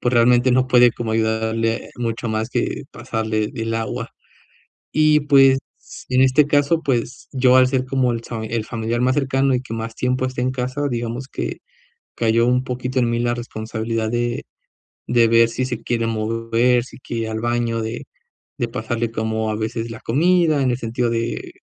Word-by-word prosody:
pues 120 Hz, -, 0 dB
realmente 120 Hz, +1 st, +4 dB
no 130 Hz, 0 st, +2 dB
puede 125 Hz, -2 st, +6 dB
como 115 Hz, -2 st, -4 dB
ayudarle 110 Hz, +1 st, 0 dB
mucho 115 Hz, -1 st, -3 dB
más 110 Hz, +2 st, -2 dB
que -, -, -2 dB
pasarle 110 Hz, -1 st, -2 dB
el 115 Hz, 0 st, -3 dB
agua. 115 Hz, 0 st, -3 dB, 0.8 s
Y, 155 Hz, 0 st, +4 dB
pues, 135 Hz, -2 st, +5 dB, 0.5 s
en 130 Hz, 0 st, +3 dB
este 135 Hz, +2 st, +4 dB
caso, 145 Hz, +3 st, +2 dB
pues 125 Hz, -1 st, -2 dB
yo, 130 Hz, -1 st, +4 dB
al 130 Hz, 0 st, +6 dB
ser 130 Hz, -1 st, 0 dB
como 130 Hz, -2 st, +1 dB
el 115 Hz, 0 st, -4 dB
fami 110 Hz, -2 st, -5 dB
el 115 Hz, -2 st, -1 dB
familiar 115 Hz, 0 st, -2 dB
más 130 Hz, +1 st, +2 dB
cercano 135 Hz, -1 st, +1 dB
y 125 Hz, -, 0 dB
que 115 Hz, -, -9 dB
más 115 Hz, 0 st, -5 dB
tiempo 130 Hz, +1 st, 0 dB
está 130 Hz, -1 st, -3 dB
en 130 Hz, -, +1 dB
casa, 130 Hz, +3 st, -2 dB
digamos 120 Hz, +2 st, -3 dB
que -, -, -4 dB, 0.6 s
cayó 115 Hz, +1 st, +2 dB
un 125 Hz, +1 st, +2 dB
poquito 125 Hz, +1 st, -3 dB
en 120 Hz, -1 st, +1 dB
mí 120 Hz, 0 st, 0 dB
la 120 Hz, 0 st, +1 dB
responsabilidad 110 Hz, -1 st, -3 dB
de 120 Hz, 0 st, -1 dB, 0.7 s
de 120 Hz, -1 st, +4 dB
ver 115 Hz, 0 st, +5 dB
si 130 Hz, -, -2 dB
se 120 Hz, -3 st, -4 dB
quiere 115 Hz, -1 st, -1 dB
mover, 115 Hz, +2 st, +1 dB
si -, -, -13 dB
quiere 115 Hz, -2 st, -4 dB
ir -, -, -4 dB
al 110 Hz, 0 st, -3 dB
baño, 120 Hz, -1 st, -1 dB
de 110 Hz, +2 st, -5 dB, 0.5 s
de 120 Hz, -, -1 dB
pasarle 115 Hz, 0 st, -3 dB
como 110 Hz, 0 st, -1 dB
a 105 Hz, -, -2 dB
veces 115 Hz, +1 st, -3 dB
la 115 Hz, -, -8 dB
comida 160 Hz, +1 st, +2 dB
en 130 Hz, -, +2 dB
el 120 Hz, -, 0 dB
sentido 120 Hz, +1 st, -1 dB
de, 115 Hz, 0 st, -3 dB
120 Hz, 190 wpm, -21 LUFS, 115-130 Hz, 0.8 s, puede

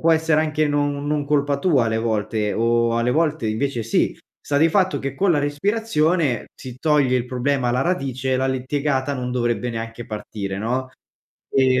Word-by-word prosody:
può 165 Hz, -, +3 dB
essere 160 Hz, -1 st, +3 dB
anche 155 Hz, -1 st, +1 dB
non 145 Hz, 0 st, -1 dB
non 150 Hz, -1 st, 0 dB
colpa 145 Hz, -1 st, +1 dB
tua 140 Hz, -8 st, +2 dB
alle 110 Hz, 0 st, 0 dB
volte, 110 Hz, -1 st, -1 dB
o 115 Hz, 0 st, +2 dB
alle 120 Hz, +1 st, +1 dB
volte 155 Hz, -5 st, +1 dB
invece 120 Hz, +2 st, -1 dB
sì, 115 Hz, -, 0 dB, 0.2 s
sta 145 Hz, -, -2 dB
di 160 Hz, +3 st, +5 dB
fatto 185 Hz, +1 st, +2 dB
che 135 Hz, 0 st, -4 dB
con 195 Hz, -3 st, +3 dB
la 150 Hz, -, +2 dB
respirazione 155 Hz, -, 0 dB
si 125 Hz, -1 st, -10 dB
toglie 145 Hz, -5 st, +3 dB
il 125 Hz, -, -2 dB
problema 130 Hz, 0 st, 0 dB
alla 125 Hz, +2 st, +1 dB
radice, 135 Hz, -6 st, -1 dB
e -, -, +2 dB
la 130 Hz, +1 st, 0 dB
litigata 135 Hz, +1 st, -1 dB
non 125 Hz, -1 st, -3 dB
dovrebbe 120 Hz, 0 st, 0 dB
neanche 115 Hz, 0 st, -6 dB
partire, 100 Hz, -2 st, -5 dB
no, 130 Hz, +4 st, -2 dB, 0.6 s
e 130 Hz, -1 st, +3 dB
130 Hz, 185 wpm, -22 LUFS, 120-150 Hz, 0.6 s, di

